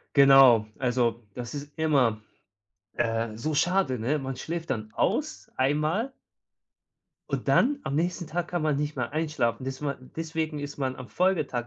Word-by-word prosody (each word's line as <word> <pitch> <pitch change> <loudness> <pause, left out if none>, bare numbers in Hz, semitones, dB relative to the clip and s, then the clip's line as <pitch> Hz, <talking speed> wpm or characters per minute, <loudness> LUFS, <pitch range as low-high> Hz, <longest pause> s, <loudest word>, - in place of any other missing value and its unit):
Genau. 135 -5 +7
Also, 120 -3 0
das 120 +1 -6
ist 145 0 -7
immer, 135 -9 +2 0.7
äh, 115 -1 -1
so 150 +7 -2
schade, 180 -5 +2
ne? 130 +7 0
Man 135 -1 -4
schläft 165 +6 -5
dann 110 -4 -3
aus, - - -1
einmal 155 - 0 1.2
und - - -2
dann, 285 +3 +3
am 140 - -2
nächsten 175 +2 -1
Tag, 175 +2 -3
kann 175 - -2
man 155 -2 +1
nicht 150 +1 -2
mehr 125 0 -3
einschlafen, 150 -7 -1
desman 135 0 -5
deswegen 160 -1 -3
ist 145 0 -6
man 130 -2 -2
am 130 -1 -9
Folgetag 155 -10 0
140 Hz, 155 wpm, -27 LUFS, 125-160 Hz, 1.2 s, Genau